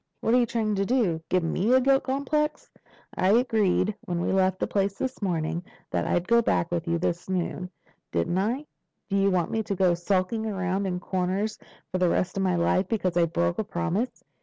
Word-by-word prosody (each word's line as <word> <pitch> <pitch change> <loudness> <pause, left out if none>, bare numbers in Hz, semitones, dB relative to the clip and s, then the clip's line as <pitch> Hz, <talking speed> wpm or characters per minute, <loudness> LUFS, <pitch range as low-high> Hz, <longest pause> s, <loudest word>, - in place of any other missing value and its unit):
"What 225 - +1
are 250 - +6
you 240 - +2
trying 225 -2 0
to 195 - +2
do? 200 -8 +1
Give 185 -1 +2
me 185 +7 0
a - - +6
guilt 270 +1 +3
complex? 300 +3 -1 0.4
I 185 +2 +2
agreed 215 -4 +2
when 175 -1 -2
we 175 - 0
left 190 -1 +2
that - - -2
place 195 -1 +1
this 260 -3 -4
morning 170 -2 -1 0.3
that - - 0
I'd 175 +1 0
go 235 0 +5
back 175 -6 0
with 170 0 -2
you 170 0 +1
this 170 +1 -2
noon, 180 0 -2 0.4
didn't 85 - 0
I? 240 +9 -1 0.4
Do 200 - 0
you 195 0 +3
want 180 -3 0
me 225 - 0
to 205 -2 -3
go 180 -1 +3
skulking 185 +5 0
around 190 -1 -1
in 180 -1 -2
corners 190 +4 -2 0.3
for 185 - -1
the 180 -1 +3
rest 180 - 0
of 195 - -1
my 185 -2 +2
life 180 +2 +2
because 185 -6 -1
I 170 -1 +4
broke 85 - 0
a - - +1
promise?" 195 - -2
190 Hz, 210 wpm, -26 LUFS, 175-220 Hz, 0.4 s, are